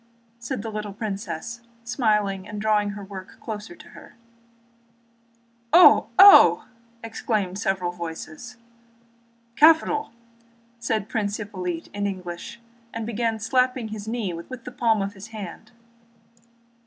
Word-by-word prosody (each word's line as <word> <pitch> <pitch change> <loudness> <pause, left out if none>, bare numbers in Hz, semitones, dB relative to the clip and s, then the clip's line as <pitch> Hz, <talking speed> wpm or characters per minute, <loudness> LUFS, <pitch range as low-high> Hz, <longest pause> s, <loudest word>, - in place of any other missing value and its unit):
said 230 -3 -5
the 225 - -5
little 210 -1 -5
princess, 205 +1 -5 0.2
smiling 210 -5 0
and 210 0 -6
drawing 210 -1 +1
her 205 - -8
work 190 -1 -10
nearer 220 +9 -6
to - - -15
her. - - -15 1.6
"Oh! 355 - +7
Oh!" 395 +1 +8 0.4
exclaimed 215 -4 -2
several 190 -3 -1
voices. 170 +7 -8 1.0
"Capital!" 320 +7 +4 0.7
said 220 -3 -2
Prince 210 -3 -2
Hippolyte 180 -5 -5
in 205 0 -2
English, 185 +3 -7 0.3
and 230 -1 -5
began 230 0 -2
slapping 250 +1 0
his 215 -1 -7
knee 220 -5 -2
with 170 +10 -8
the 250 - -8
palm 230 -4 +1
of 200 +1 -5
his 200 +1 -11
hand. 215 0 -9
210 Hz, 120 wpm, -24 LUFS, 195-230 Hz, 1.6 s, Oh